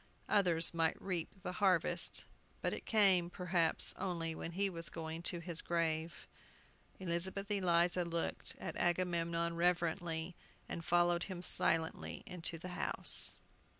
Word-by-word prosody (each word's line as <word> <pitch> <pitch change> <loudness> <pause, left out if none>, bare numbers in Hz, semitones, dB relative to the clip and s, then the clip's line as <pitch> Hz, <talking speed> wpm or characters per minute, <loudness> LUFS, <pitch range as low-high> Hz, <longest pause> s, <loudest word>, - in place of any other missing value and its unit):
Others 175 -5 +3
might 165 -1 0
reap 180 -4 -2
the - - -3
harvest, 185 -3 +2 0.4
but - - 0
it - - -6
came, 190 -5 +4
perhaps, 180 -3 +2
only 170 -4 -2
when 165 +1 -6
he 200 +3 +1
was 170 -3 -1
going 160 0 -6
to 175 - -3
his 170 -1 -1
grave. 165 -1 -2 0.7
Elizabeth 190 +3 -3
Eliza 180 -2 +2
looked 170 -1 -3
at - - -6
Agamemnon 170 -1 0
reverently, 170 -1 0 0.3
and 170 - -5
followed 175 +1 +2
him 180 -2 -6
silently 160 -2 -1
into 170 -2 -4
the 180 +3 -8
house. 180 - +4
170 Hz, 130 wpm, -35 LUFS, 165-180 Hz, 0.7 s, came